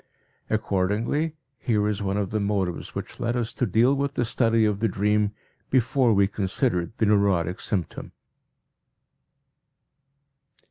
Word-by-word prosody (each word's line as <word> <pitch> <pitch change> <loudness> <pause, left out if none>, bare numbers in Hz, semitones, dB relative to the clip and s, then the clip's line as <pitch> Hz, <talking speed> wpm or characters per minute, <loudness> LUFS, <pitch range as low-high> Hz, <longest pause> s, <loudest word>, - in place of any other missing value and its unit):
Accordingly 110 - 0 0.2
here 105 -4 +1
is 105 -1 -2
one 100 0 -1
of 100 -2 -2
the 110 - 0
motives 100 -4 -2
which - - -6
led 120 +1 -1
us 120 -1 -2
to 125 - -1
deal 115 +7 +3
with 140 0 -1
the 120 - +1
study 115 -1 +2
of 105 -2 0
the 115 - +2
dream 105 0 +1 0.4
before 130 -1 +3
we 100 -2 +4
considered 95 -2 -1
the 110 - +2
neurotic 100 -4 +2
symptom. 95 -6 -4
105 Hz, 135 wpm, -25 LUFS, 100-120 Hz, 0.4 s, we